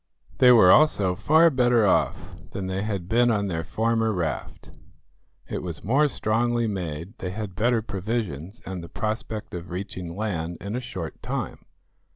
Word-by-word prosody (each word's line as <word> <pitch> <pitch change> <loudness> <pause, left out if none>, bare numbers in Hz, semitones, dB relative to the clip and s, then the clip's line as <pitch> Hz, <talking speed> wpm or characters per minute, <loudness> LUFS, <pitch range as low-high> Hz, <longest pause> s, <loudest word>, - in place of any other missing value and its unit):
They 125 - +8
were 105 -7 +8
also 105 -12 +4
far 160 - +4
better 120 -4 +3
off 95 - +1 0.2
than 100 - -4
they 95 +1 -2
had 100 -4 -3
been 120 +3 +3
on 105 -3 +1
their 80 -2 -2
former 115 +2 0
raft. 85 -7 -4 0.8
It - - -4
was 85 -4 -6
more 140 +8 +3
strongly 120 -1 0
made, 90 0 -5
they 90 - -3
had 100 0 -5
better 115 +3 +1
provisions, 100 - -4
and 95 -2 -5
the 85 - -9
prospect 110 0 -4
of 85 -1 -6
reaching 90 -1 -6
land 85 -6 -3
in 100 +3 -5
a - - -1
short 95 -10 -7
time. - - -4
105 Hz, 165 wpm, -25 LUFS, 90-115 Hz, 0.8 s, They